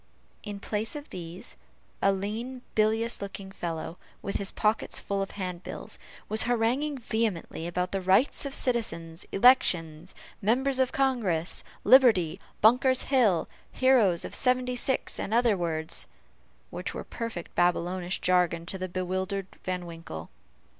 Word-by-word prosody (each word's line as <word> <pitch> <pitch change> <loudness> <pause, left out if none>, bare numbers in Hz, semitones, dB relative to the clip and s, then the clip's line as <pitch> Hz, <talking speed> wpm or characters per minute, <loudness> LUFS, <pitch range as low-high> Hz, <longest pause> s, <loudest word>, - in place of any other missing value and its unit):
In 205 -1 -6
place 215 +4 -3
of 295 0 -8
these, 175 0 -8 0.5
a 195 - +4
lean, 225 +6 -4
bilious 220 +2 +1
looking 195 -1 -7
fellow, 170 -2 -5 0.2
with 200 - -2
his 200 - -1
pockets 215 +1 0
full 200 -1 -2
of 195 - -2
handbills, 180 -2 -5 0.3
was 215 +1 +4
haranguing, 245 +5 +1
vehemently 220 -8 -2
about 180 +2 -2
rights 195 +9 +3
of 280 -1 -3
citizens 170 -10 -2
elections 180 -8 +3 0.3
members 260 +6 +2
of 260 -1 +2
Congress 220 -12 0 0.2
liberty 225 -12 +5 0.2
Bunker's 255 +4 +5
hill 215 -10 +4 0.2
heroes 235 -10 +4
of - - -7
seventy 250 -1 +2
six 260 +2 0
and 215 - -1
other 235 -3 +4
words, 160 -3 -2 0.6
which - - -5
were - - -4
a - - -11
perfect 230 -7 -6
Babylonish 175 +1 0
jargon 175 -2 +2
to 190 +2 -2
the 185 0 -3
bewildered 185 +2 -2 0.2
Van 180 -1 -3
Winkle. 165 - -8
200 Hz, 135 wpm, -28 LUFS, 175-240 Hz, 0.6 s, liberty